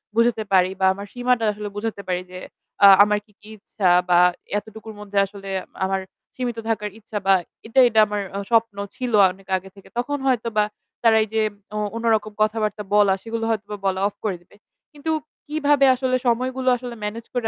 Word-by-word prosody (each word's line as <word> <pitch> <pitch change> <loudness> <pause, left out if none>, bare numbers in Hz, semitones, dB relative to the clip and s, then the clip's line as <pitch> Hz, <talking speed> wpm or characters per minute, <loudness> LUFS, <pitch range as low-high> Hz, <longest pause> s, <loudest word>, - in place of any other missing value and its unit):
বুঝাতে 230 -1 +2
পারি, 185 0 +4
বা 190 - +2
আমার 200 +1 -8
সীমাটা 245 -1 +1
আসলে 210 0 -6
বুঝাতে 210 -1 -4
পারি। 180 0 -1
যে 185 - -7 0.5
আ - - +11 0.2
আমার 210 0 +1
কি 210 - -27
কি 210 - -14
ইচ্ছা 195 -2 -1 0.2
বা 175 0 +5 0.4
এতটুকুর 220 +1 -11
মধ্যে 205 -1 -6
আসলে 195 0 -10 0.4
আমার 190 0 -1 0.3
সীমিত 245 -2 -3
থাকার 210 -2 -1
ইচ্ছা, 215 -1 -6
বা 195 - +7 0.3
এটা, 235 - +2
এটা 220 -1 +2
আমার 210 0 -2 0.3
স্বপ্ন 230 -2 +2 0.2
ছিল 250 -2 -3 0.2
অনেক 190 +1 -17
আগে 190 +1 -11
থেকে। 195 - -16
তখন 285 +4 -1
হয়তো 245 -3 +1
বা 210 - +5 0.4
তারা 225 -1 +5
এই - - -6
যে 220 - +2 0.3
অ - - -2 0.2
অন্য 230 0 -4
রকম 215 0 -4
কথাবার্তা 215 -1 0
বলা, 205 -2 +5
সেগুলো 230 0 -4
হয়তো 220 -2 -1
বা 210 - -4
বলা 190 -1 +1
অফ 205 - -8
করে 195 -4 0
দিবে। 175 - -23 0.4
কিন্তু 300 +2 -4 0.4
কিভাবে 290 -2 +3
আসলে 255 0 0
সময়গুলো 255 +2 +1
আসলে 245 -1 -7
ম্যানেজ 220 +2 -5
করে 245 -3 -1
220 Hz, 190 wpm, -22 LUFS, 205-240 Hz, 0.5 s, আ